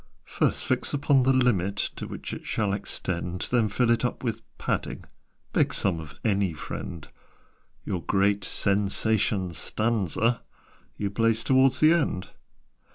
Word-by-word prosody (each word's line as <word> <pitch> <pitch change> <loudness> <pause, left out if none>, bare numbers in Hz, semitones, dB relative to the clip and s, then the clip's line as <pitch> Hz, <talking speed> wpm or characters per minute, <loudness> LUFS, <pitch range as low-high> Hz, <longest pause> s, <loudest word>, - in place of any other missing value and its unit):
"First - - 0
fix - - 0
upon 140 -1 +3
the 130 +1 +3
limit 110 -7 +2 0.2
To - - -5
which - - -6
it - - -8
shall 105 -3 0
extend: 90 -2 -3
Then 115 -3 +3
fill 115 +4 +2
it 115 - +2
up 125 - -2
with 115 -2 -2 0.2
'Padding' - - -2 0.5
(Beg - - +2
some 95 -5 +1
of 75 -2 -10
any 100 -4 +2
friend): 80 +1 -7 0.8
Your 90 - -2
great 100 +3 +2
SENSATION 100 -1 +1
STANZA 115 +4 0 0.6
You 100 -1 -2
place 115 +1 +2
towards 130 0 +4
the 155 +2 +7
end." 145 - 0
105 Hz, 140 wpm, -26 LUFS, 95-120 Hz, 0.8 s, the